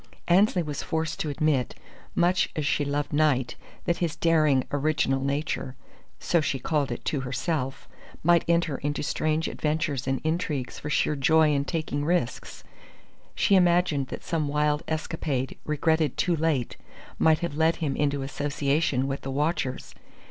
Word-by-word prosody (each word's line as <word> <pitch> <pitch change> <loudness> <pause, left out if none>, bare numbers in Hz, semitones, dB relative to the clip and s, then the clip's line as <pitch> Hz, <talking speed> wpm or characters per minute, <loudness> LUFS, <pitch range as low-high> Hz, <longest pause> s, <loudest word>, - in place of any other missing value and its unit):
Annesley 180 0 +4
was 150 -2 -4
forced 160 0 -2
to 155 - -2
admit, 145 -3 0 0.4
much 175 +2 +2
as 155 -3 -2
she 140 +1 +1
loved 145 +1 -2
Knight, 145 -5 +2 0.3
that 170 - +1
his 170 -3 -1
daring, 155 -5 +3
original 145 -2 +1
nature 140 -2 -2 0.4
(so 170 - +2
she 140 - -1
called 140 +2 -1
it - - -6
to 145 - 0
herself) 135 +1 -3 0.4
might 170 +1 +4
enter 170 -4 +1
into 145 +1 -2
strange 155 +2 0
adventures 150 -4 -2
and 135 0 0
intrigues 155 -5 -2
for 150 - -5
sheer 150 - +1
joy 155 +2 +4
in 140 0 0
taking 155 -3 -2
risks. 165 -6 -2 0.7
She - - +2
imagined 175 -6 +3
that - - -7
some 160 -3 -1
wild 150 +1 +1
escapade 155 -4 -3
regretted 155 -1 +1
too 175 - +2
late 155 -6 -1 0.4
might 160 -1 +5
have 170 -3 -2
led 160 +1 +3
him 145 -4 -2
into 140 -1 0
association 140 -1 0
with 135 0 -3
the 135 - -6
watchers. 140 -1 -2
150 Hz, 155 wpm, -26 LUFS, 140-160 Hz, 0.7 s, might